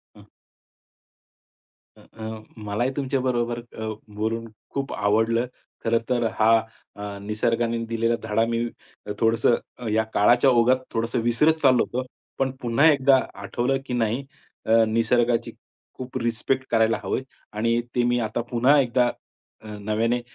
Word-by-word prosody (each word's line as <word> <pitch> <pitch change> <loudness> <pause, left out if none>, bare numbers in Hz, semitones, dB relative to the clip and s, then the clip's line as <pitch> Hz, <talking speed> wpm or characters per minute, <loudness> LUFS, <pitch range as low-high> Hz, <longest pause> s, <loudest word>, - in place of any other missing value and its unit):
हं. - - -16 1.7
अ, - - -17
अ, 110 0 -8 0.2
मलाही 110 +5 -1
तुमच्या 135 -1 -1
बरोबर 120 -2 -1
अ, 110 -2 -8 0.3
बोलून 115 +2 -2 0.3
खूप 140 0 -3
आवडलं. 110 +4 +2 0.4
खरं 115 0 +2
तर 120 -2 +1 0.2
हा 110 +1 +5 0.4
अ, 100 -1 -6
निसर्गाने 115 +2 0
दिलेला 115 +1 0
धडा 110 +1 +1
मी 115 0 -1 0.5
थोडंसं 115 +1 +3 0.4
या 110 0 +3
काळाच्या 120 +6 +5
ओघात 125 +1 +4 0.2
थोडंसं 115 +2 -1
विसरत 135 +7 +3
चाललो 130 -3 +5
होतो. 130 +1 -4 0.3
पण 135 -1 0
पुन्हा 120 +6 +3
एकदा 135 -1 +4 0.3
आठवलं, 125 +6 0
की 125 - -5
नाही 120 +3 0 0.4
अ, 115 +1 +5
निसर्गाची 115 +1 +1 0.5
खूप 130 0 -6
रिस्पेक्ट 130 +3 -1
करायला 110 0 +3
हवं - - -1
आहे 130 - -5 0.3
आणि 115 +2 +2 0.2
ते 120 - +3
मी 120 0 +2
आता 110 +1 -2
पुन्हा 130 +5 +4
एकदा 125 -1 +2 0.5
अ, 110 - -12
नव्याने 115 +4 0
115 Hz, 140 wpm, -24 LUFS, 110-125 Hz, 1.7 s, हा